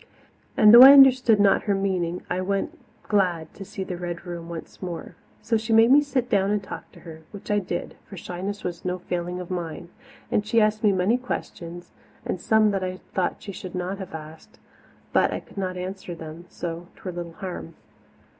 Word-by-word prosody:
And, 215 0 +7
though 240 - +11
I 270 +2 +12
understood 255 -5 +7
not 200 -1 +3
her 205 -2 +1
meaning, 180 -3 -1
I 180 +1 -2
went, 195 +1 -2 0.3
glad 180 -6 0
to 195 - -9
see 195 0 -6
the 180 -1 -5
Red 175 0 -6
Room 170 -1 -7
once 165 -1 -9
more. 175 -1 -6 0.3
So 225 +1 +1
she 220 +1 -2
made 225 +2 +6
me 290 +2 +7
sit 270 -4 -1
down 195 -4 +2
and 205 -1 0
talk - - -9
to - - -15
her, 160 -2 -11
which 205 0 -8
I 205 - +3
did, 175 -3 -5
for 195 - -9
shyness 190 +4 -5
was 175 -2 -5
no 180 0 -2
failing 180 0 -4
of 180 0 -7
mine; 170 -1 -5 0.4
and 210 - +2
she 230 +2 +2
asked 215 0 +1
me 210 - +5
many 195 +6 +1
questions, 175 -8 -6 0.3
and 180 - -3
some 220 -1 +3
that 195 -1 -2
I 185 0 -3 0.2
thought 185 -2 -1
she 200 - -6
should 185 -1 -8
not 185 +2 -3
have 190 -4 -7
asked, 155 0 -11 0.6
but - - +3
I - - -3
could - - -19
not 185 -1 -3
answer 185 -1 -6
them, 165 +1 -10
so 170 0 -6
'twere 185 - -7
little 170 -1 -6
harm. 175 -3 -7
185 Hz, 205 wpm, -24 LUFS, 175-210 Hz, 0.6 s, I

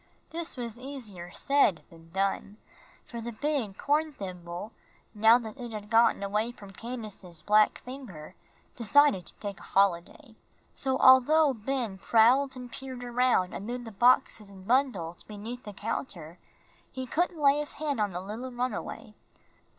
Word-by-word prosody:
This 330 -3 -5
was 235 -1 -6
easier 230 -10 -8
said 220 - +2
than 165 0 -16
done, 195 +3 -1 0.5
for 235 -1 -7
the 235 +1 -5
big 240 -5 -2
horn 305 +2 +1
thimble, 180 -3 -7 0.4
now 220 +2 +6
that 235 +1 -8
it 240 -2 -6
had 210 -1 -7
gotten 230 -2 +4
away 210 +4 -1
from 200 -5 -13
Candace's 205 -8 -7
black 210 +2 +4
finger, 245 - -10 0.4
decided 245 -4 +4
to - - -10
take 200 -2 -6
a - - -15
holiday. 195 +3 +1 0.4
So 265 -1 -1
although 275 +4 +6
Ben 230 -3 -3
prowled 250 +6 +4
and 250 -1 -9
peered 260 -2 -7
around 245 -6 +2
amid 240 +4 -5
the 225 - -8
boxes 220 -1 +3
and 190 -1 -13
bundles 230 -10 +1
beneath 220 +4 -8
the 210 - -7
counter, 180 - -5 0.5
he 260 -1 -5
couldn't 345 +6 0
lay 285 0 +4
his 295 - -4
hand 290 -4 -2
on 205 - +1
the 180 0 -4
runaway. 240 +1 -5
230 Hz, 150 wpm, -29 LUFS, 200-260 Hz, 0.5 s, now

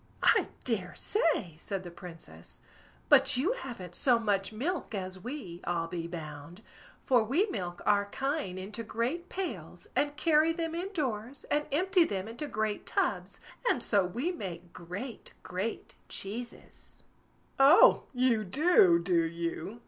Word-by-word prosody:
"I - - +5 0.2
dare 195 -7 -2
say!" 310 - 0
said 195 +1 -4
the 175 - -8
Princess; 165 - -12 0.4
"but - - +5
you 340 - +2
haven't 235 - -7
so 245 +5 +3
much 205 -3 0
milk 270 - -3
as 185 -1 -5
we, 195 - -7
I'll 170 -1 -1
be 170 -1 -4
bound; 160 +2 -8 0.4
for 250 -4 +4
we 280 - +2
milk 175 -4 -4
our 205 -1 +4
kine 270 - -2
into 200 +5 -6
great 245 +11 -2
pails, 380 -1 -5
and 290 0 +1
carry 320 0 +4
them 330 -1 -3
in 360 +4 -3
doors, 260 - -3
and 295 0 +1
empty 365 +4 +4
them 195 - -3
into 240 +7 -5
great 215 -3 -2
tubs, - - -1 0.3
and 245 - +1
so 200 -3 +3
we 240 - -2
make 180 - -7
great, 200 +8 -7
great 190 +5 -4 0.2
cheeses." 235 +5 -8 0.6
"Oh! 280 +6 +7
you 250 -4 +2
do, 200 - +5
do 170 0 +2
you?" 170 +6 -4
220 Hz, 145 wpm, -30 LUFS, 180-290 Hz, 0.6 s, Oh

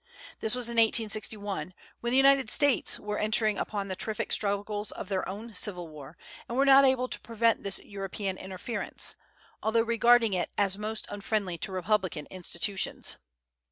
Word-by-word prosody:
This 220 +2 +1
was 250 -2 0
in 235 0 -4
1861, 210 -5 +1 0.2
when 235 - -2
the 255 - +3
United 270 -3 +5
States 285 -1 +2
were 210 0 -3
entering 215 -1 +1
upon 200 -2 -3
the 190 - -3
terrific 215 +3 -3
struggles 205 +1 0
of - - -6
their 190 -2 -1
own 215 +4 -7
civil 180 -3 -1
war, 150 0 -11 0.3
and 235 - -3
were 275 - +4
not 275 0 +8
able 260 -1 +2
to - - -5
prevent 230 0 +1
this 200 -1 -1
European 195 -1 -5
interference, 190 +5 -3 0.5
although 225 +1 +2
regarding 235 -1 +4
it 180 - 0
as 195 -2 +2
most 215 +1 -3
unfriendly 200 -4 -2
to 195 - -3
republican 185 -4 0
institutions. 185 +1 -1
210 Hz, 160 wpm, -29 LUFS, 190-230 Hz, 0.5 s, not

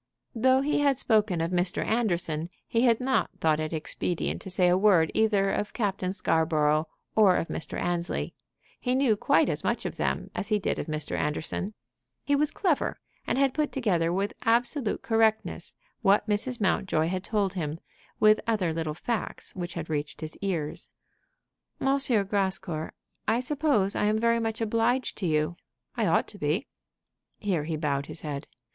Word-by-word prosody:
Though 260 +3 +3
he 295 +1 +1
had 280 -2 +3
spoken 215 -8 +2
of 165 +2 -1
Mr. 180 0 0
Anderson, 175 -8 0 0.2
he 230 - +1
had 230 -2 +4
not 260 +1 +1
thought 155 -1 +2
it 155 0 -2
expedient 165 +2 -2
to - - -7
say 180 -1 +2
a 175 - +4
word 185 -5 +4
either 205 -3 +2
of 210 - -2
Captain 195 -5 -1
Scarborough 155 -4 +2 0.3
or 205 -4 +6
of 165 - -1
Mr. - - -4
Annesley. 175 0 -2 0.5
He 250 0 0
knew 260 -5 +3
quite - - +3
as - - -2
much - - -1
of - - -4
them - - -2
as 200 - -3
he 215 -1 +2
did 200 - -2
of - - -4
Mr. 155 -1 -3
Anderson. 160 +7 -2 0.5
He 285 - +2
was 295 +1 +2
clever, 350 -8 0 0.3
and - - 0
had 270 -1 +3
put 300 0 0
together 180 -10 +1
with 195 +4 -1
absolute 235 +1 +1
correctness 225 -1 +1 0.3
what 205 0 +3
Mrs. 220 +4 -1
Mountjoy 185 -5 +1
had 185 0 -2
told 200 -3 0
him, 160 -4 -3 0.4
with 215 0 +5
other 195 -8 +1
little 160 -2 -3
facts 230 +6 -2
which 175 -1 -5
had 165 -2 -4
reached 150 -1 -3
his 155 0 -6
ears. 170 -7 -3 0.9
"M. 270 +1 +2 0.3
Grascour, 190 -5 -1 0.3
I 225 +2 +3
suppose 260 -7 +2
I - - +1
am 215 +1 +2
very 230 +1 +2
much 225 0 -2
obliged 230 +3 +1
to 190 - -1
you. 155 +2 0 0.4
I - - +1
ought - - +2
to - - -11
be." - - 0 0.7
Here 180 -8 -1
he 160 -1 -2
bowed 140 -2 -1
his - - -6
head. 145 -1 -5
195 Hz, 175 wpm, -27 LUFS, 165-230 Hz, 0.9 s, or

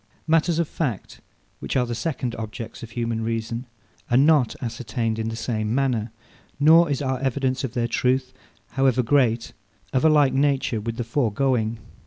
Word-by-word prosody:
Matters 165 +1 +2
of 170 -2 +1
fact, 130 - -4 0.4
which - - -4
are 125 - +2
the 120 - -4
second 125 -2 -3
objects 110 +1 -7
of 115 - -8
human 115 -1 -2
reason, 115 +2 -3 0.4
are 120 - +3
not 145 -3 +4
ascertained 115 -2 -3
in 110 0 -2
the 115 - -4
same 110 -1 -2
manner; 125 -5 0 0.5
nor 160 +3 +6
is 140 0 -1
our 130 -1 -1
evidence 130 0 -1
of 130 - -4
their 120 -1 +1
truth, 130 +2 0 0.4
however 130 -1 +2
great, 120 -3 +2 0.4
of 130 - +2
a 160 - +6
like 145 -4 +4
nature 135 -5 +1
with 115 +1 -4
the 120 - -1
foregoing. 120 -1 0
125 Hz, 170 wpm, -24 LUFS, 115-135 Hz, 0.5 s, nor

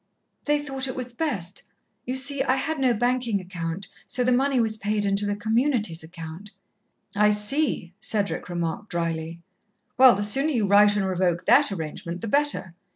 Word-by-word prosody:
"They 295 0 +2
thought 270 -2 -3
it 260 - -5
was 250 -1 -6
best. 205 - -3 0.5
You 255 - -2
see, 275 +1 -1
I 260 - +2
had 295 +3 -2
no 260 -2 +3
banking 240 -2 0
account, 180 0 -5 0.2
so 250 - 0
the 250 - +2
money 265 +1 +2
was 220 -2 +1
paid 210 0 -1
into 200 +1 +1
the 205 - -1
Community's 220 - 0
account." 165 +4 -9 0.7
"I 210 +1 +4
see," 210 - 0
Cedric 205 -3 -2
remarked 175 +4 -3
drily. 165 0 -3 0.6
"Well, 255 -4 +8
the 205 - -2
sooner 270 +9 +3
you 235 -8 +1
write 205 +1 +5
and 200 -2 0
revoke 180 -2 0
that 265 0 +5
arrangement, 170 0 -5
the 230 - -4
better. 215 -9 0
210 Hz, 170 wpm, -25 LUFS, 180-255 Hz, 0.7 s, Well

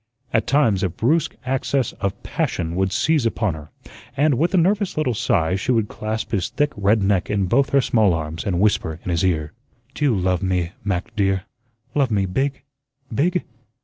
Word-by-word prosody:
At 115 - +1
times, 120 -9 +3
a 95 - +1
brusque 150 - 0
access 130 -1 0
of 100 -1 -2
passion 85 0 -2
would 95 0 +1
seize 150 +3 +2
upon 110 -5 -1
her, 75 -1 -10 0.5
and, 145 +1 +3
with 160 +8 +1
a - - +4
nervous 195 +2 +1
little 150 -5 +1
sigh, 85 -5 +1
she 95 +6 -1
would 115 -4 +1
clasp 110 +2 -4
his 95 -6 0
thick 145 0 0
red 100 +1 +2
neck 95 -2 +1
in 100 -2 +1
both 135 +9 +2
her 140 - +4
small 110 -8 +3
arms 80 0 -4
and 90 -3 -1
whisper 90 -6 +1
in 90 - -3
his 85 +1 0
ear: 80 -4 0 0.4
"Do 150 - -1
you 130 -6 +3
love 90 -1 0
me, 90 -3 0
Mac, 95 -4 -3
dear? 95 -2 +1 0.5
Love 140 -4 +2
me 100 -3 +1
BIG, 135 +9 -2 0.5
BIG? 175 +9 +1
105 Hz, 190 wpm, -22 LUFS, 90-135 Hz, 0.5 s, a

